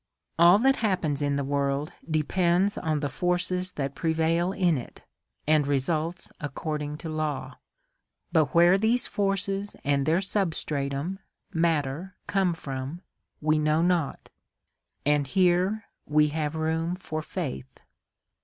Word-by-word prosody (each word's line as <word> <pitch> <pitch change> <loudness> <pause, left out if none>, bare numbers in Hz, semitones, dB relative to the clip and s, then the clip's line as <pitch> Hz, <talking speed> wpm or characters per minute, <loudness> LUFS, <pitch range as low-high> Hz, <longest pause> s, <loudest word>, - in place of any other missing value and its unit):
"All 175 +3 +8
that 270 +5 +3
happens 170 -9 0
in 145 -1 +1
the 140 - 0
world 140 +1 -1 0.2
depends 175 +5 +2
on 155 -3 -1
the 145 - 0
forces 180 +3 -1
that 140 -1 -3
pre 160 +1 0
vail 165 +3 +1
in 180 -4 +2
it, 125 - -7 0.4
and 150 -2 +3
results 155 +5 -1
according 150 0 -4
to - - -2
law; 150 -4 -3 0.7
but 160 -3 +4
where 175 +3 +6
these 230 +4 +2
forces 195 -1 -1
and 140 -1 +1
their 165 +3 +3
substratum, 160 -4 -1 0.3
Matter, 165 +1 0
come 190 -4 +1
from, 140 +4 -6 0.4
we 155 0 +2
know 155 +2 +2
not, 175 -5 0 0.7
and 145 -1 +2
here 185 +5 +2 0.2
we 150 0 +4
have 150 0 -2
room 160 +2 -1
for 155 -4 -5
faith." 135 -6 -6
160 Hz, 130 wpm, -27 LUFS, 145-180 Hz, 0.7 s, All